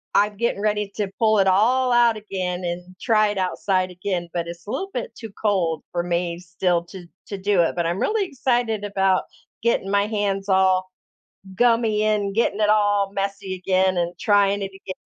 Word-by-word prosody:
I'm 205 +1 +3
getting 235 -2 -1
ready 210 -1 0
to 205 -2 -2
pull 220 -2 +4
it 195 - +3
all 245 +7 +3
out 240 -2 +4
again 185 -4 -4
and 175 +1 -5
try 215 -3 +3
it 205 - -3
outside 185 0 0
again, 180 -1 -3
but 170 -1 -2
it's 170 0 -9
a - - -4
little 390 - -3
bit - - -4
too 225 -3 -9
cold 180 -7 0
for 175 - -1
me 170 -1 -2
still 180 -1 -1
to 180 0 -11 0.2
to 200 - -5
do 195 -1 +2
it 165 - 0
but 170 -1 -1
I'm 170 +3 -1
really 425 -2 +1
excited 240 - -1
about 195 -2 +1 0.4
getting 220 -4 0
my 200 0 +2
hands 205 -2 -1
all 190 -1 +3 0.7
gummy 230 -1 +2
and 205 -2 0
getting 215 -1 +1
it 210 - +3
all 205 -2 +3
messy 195 -1 -3
again 185 0 +1
and 175 0 0
trying 200 -1 +3
it - - -1
again 195 -1 -8
195 Hz, 190 wpm, -22 LUFS, 185-215 Hz, 0.7 s, pull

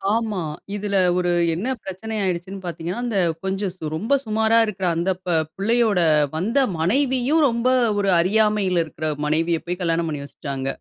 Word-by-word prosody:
ஆமா. 220 -5 -1 0.3
இதுல 205 -1 -1 0.2
ஒரு 180 -1 +1 0.2
என்ன 190 +10 -2
பிரச்சன 215 +4 -5
ஆயிடுச்சுன்னு 185 +1 -3
பாத்தீங்கனா 175 +4 -4
அந்த 230 -4 -1 0.3
கொஞ்சம் 190 -1 -2
சு 155 -4 -4
ரொம்ப 230 - +1
சுமாரா 220 +1 +3
இருக்குற 195 -3 -4
அந்த 170 +3 0
ப - - -4 0.3
பிள்ளையோட 220 0 +2 0.4
வந்த 220 - +1 0.2
மனைவியும் 260 - +2
ரொம்ப 235 +1 -1 0.3
ஒரு 195 -1 +2
அறியாமையில 200 -1 +2
இருக்குற 155 0 -4 0.2
மனைவிய 165 +2 +1
போய் 180 +1 -3
கல்யாணம் 165 -1 0
பண்ணி 145 -2 -4
வச்சுட்டாங்க 135 -1 -5
195 Hz, 150 wpm, -22 LUFS, 170-220 Hz, 0.4 s, சுமாரா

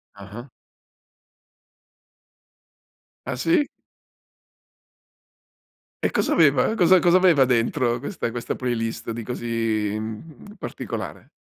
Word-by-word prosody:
Ah-ah. 105 +6 -10 2.8
Ah, 130 - -2
sì? 165 - +2 2.4
E - - +1
cosa - - +1
aveva? 145 - +3
Cosa 185 -1 +5
cosa 175 +1 +4
aveva 175 -7 +5
dentro 120 0 +1
questa 140 - -4
questa 120 0 -4
playlist 115 -3 -3
di 115 0 -5
così, 115 -3 -2
mhmm, 110 - -8
particolare? - - -6
120 Hz, 90 wpm, -23 LUFS, 115-165 Hz, 2.8 s, Cosa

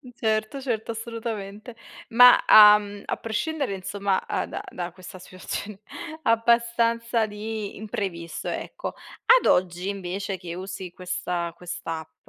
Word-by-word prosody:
Certo, 220 +3 -1
certo 230 -4 -2
assolutamente. 225 -1 -6 0.3
Ma 245 +1 +8
a 210 -1 +10
mhmm, 205 -1 -9
a - - -2
prescindere 265 +1 -2
insomma 195 0 -2
a - - -2
da - - -6
da 175 -1 -5
questa 185 +1 -11
situazione 185 +3 -6 0.5
abbastanza 230 0 +2
di 215 0 -5
imprevisto 195 -6 -5
ecco. - - -5 0.5
Ad - - -8
oggi 180 +1 +2
invece, 195 0 -4
che 175 -1 -7
usi 190 0 -7
questa 180 -2 -3
quest'app 165 -2 -6
205 Hz, 120 wpm, -25 LUFS, 185-230 Hz, 0.5 s, a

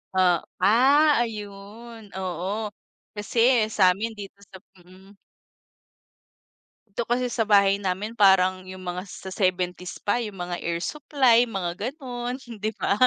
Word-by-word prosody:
Oh, 180 -2 +4 0.2
ah, 275 +9 +5
ayun. 215 0 -6
Oo. 190 +4 -3 0.4
Kasi 230 +2 +2
sa'min 205 +2 +2
dito 200 -1 -10
sa - - -16 0.2
mm. 190 +3 -18 1.7
Dito 220 +3 -4
kasi 250 +1 +1
sa 225 - 0
bahay 200 -1 +5
namin, 195 +3 -2
parang 190 -3 +4
yung 185 0 -9
mga 180 +1 -4 0.2
sa 190 - -7
70s 180 -1 -1
pa 205 - +2
yung 205 -3 -8
mga 175 0 -4
air 170 0 -2
supply, 270 -5 +3 0.2
mga 175 -2 -2 0.2
gano'n, 250 -4 -6 0.3
'di 215 +1 -1
ba? - - +2
205 Hz, 130 wpm, -25 LUFS, 185-230 Hz, 1.7 s, ah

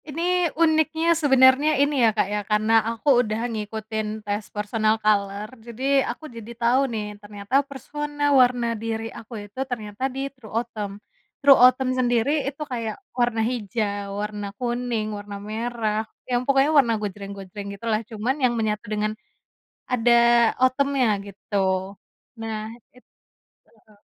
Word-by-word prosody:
Ini 345 +3 +1
uniknya 320 0 +3
sebenarnya 280 -1 +5
ini 285 -1 +2
ya, 230 - +6
Kak, - - +3
ya 210 - 0
karena 215 +1 +2 0.2
aku 245 +2 +3
udah 220 0 -2
ngikutin 215 0 -4
tes 205 +1 -3
personal 215 +1 0
color 205 -1 0
jadi 260 +4 +1
aku 245 +6 -6
jadi 235 -5 -9
tahu 250 +3 +2
nih 220 -3 -3 0.2
ternyata 205 +6 0
personal 290 +1 -2
warna 245 -2 +2
diri 225 0 -4
aku 230 +2 -11
itu 205 +5 -13
ternyata 215 -1 -5
di 270 +1 -4
true 250 -5 -14
autumn. 215 -4 -4 0.4
True 280 -1 +8
autumn 255 0 +3
sendiri 245 0 +1 0.2
itu 280 +2 -12
kayak 230 -3 -3 0.2
warna 240 -2 +1
hijau, 205 -4 -3
warna 210 -1 -4
kuning, 240 -3 -2
warna 205 0 -7
merah, 220 -1 -1 0.3
yang 245 -1 +1
pokoknya 275 +2 +4
warna 240 -5 +5
gojreng-gojreng 200 0 -6
gitu 230 - -10
lah 215 0 +1
cuman 230 +4 -1
yang 245 -1 +4
menyatu 215 0 -1
dengan. 215 0 -1 0.7
Ada 240 -1 +2 0.5
autumn-nya 275 0 +2 0.2
gitu 200 +1 -9 0.9
nah 220 0 -4 0.2
it 250 - -22 0.8
heeh. 210 -1 -23
230 Hz, 140 wpm, -24 LUFS, 215-260 Hz, 0.9 s, True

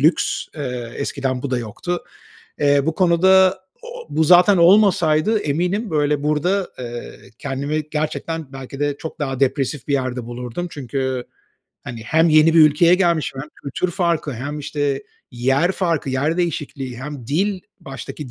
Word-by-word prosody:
lüks, 155 +5 +2
eee, 125 -5 -5
eskiden 135 -2 -2
bu 140 - -3
da 125 - 0
yoktu. 145 - -4 0.6
Eee, 145 -1 +4
bu 160 - -1
konuda, 190 +1 +4 0.2
o 480 - -11
o 475 - -15
bu 160 - +1
zaten 180 +4 +6
olmasaydı 185 +1 +4
eminim 180 +9 -1
böyle 150 -2 0
burada, 175 +6 +1
eee, 120 -1 -7 0.2
kendimi 145 +3 -3
gerçekten 155 -1 -3
belki 135 +1 -8
de 145 -1 -1
çok 160 - -8
daha 135 -3 -3
depresif 135 0 0
bir 140 - 0
yerde 130 -3 -1
bulurdum. 125 +8 -5
Çünkü, 130 -1 -3 0.6
hani, 115 -2 -7
hem 160 +7 +3
yeni 155 +1 +5
bir 165 - +7
ülkeye 155 +3 +6
gelmişim 170 -7 0
hem 150 - -8 0.2
kültür 175 +6 -2
farkı 170 -5 -1
hem 140 +5 -5
işte 140 -1 -2 0.3
yer 135 +9 +1
farkı, 165 -8 -1
yer 145 +6 0
değişikliği, 145 -7 -3
hem 135 -3 -7
dil, 185 - 0 0.2
baştaki 135 0 -8
150 Hz, 155 wpm, -20 LUFS, 135-170 Hz, 0.6 s, bir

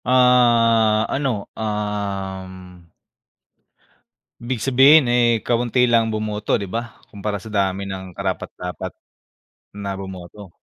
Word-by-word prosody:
Ah 115 -3 +4
ano, 135 -7 -1
um 95 -4 -5 1.5
Ibig 120 0 -4
sabihin, 135 +4 +6
eh, 120 -2 +2
kaunti 120 +1 +1
lang 115 -1 +4
bumoto 105 -1 -1
di 100 - -2
ba, 115 +2 -5 0.2
kumpara 105 0 -4
sa 110 - -10
dami 100 -1 0
ng 95 -2 -7
karapat-dapat 90 0 -5 0.8
na 100 -1 -5
bumoto. 95 0 -10
105 Hz, 100 wpm, -21 LUFS, 95-120 Hz, 1.5 s, sabihin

